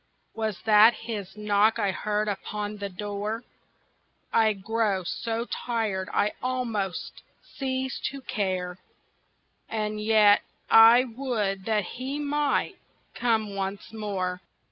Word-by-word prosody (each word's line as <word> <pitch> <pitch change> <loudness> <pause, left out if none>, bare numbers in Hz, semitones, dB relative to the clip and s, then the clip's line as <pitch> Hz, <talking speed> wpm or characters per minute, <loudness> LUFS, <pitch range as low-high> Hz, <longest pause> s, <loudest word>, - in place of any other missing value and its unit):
Was 220 -3 -3
that 220 +1 +7
his 210 -4 -6
knock 210 +1 +3
I 205 -3 +1
heard 210 +2 -1
upon 210 +1 -4
the 200 -1 -4
door? 205 +4 -4 0.9
I 220 -1 +4
grow 205 -1 -1
so 230 +6 -3
tired 220 -7 -2
I 210 - +2
almost 230 -7 -3 0.2
cease 260 -1 -3
to 275 0 -8
care, 185 -5 -2 0.9
And 215 -1 -2
yet 210 -1 +5 0.3
I 230 +2 +9
would 225 -6 -2
that 215 -2 +1
he 260 +9 -5
might 295 0 0 0.4
come 220 -4 0
once 195 +2 -4
more. 190 -4 -3
215 Hz, 115 wpm, -27 LUFS, 200-230 Hz, 0.9 s, I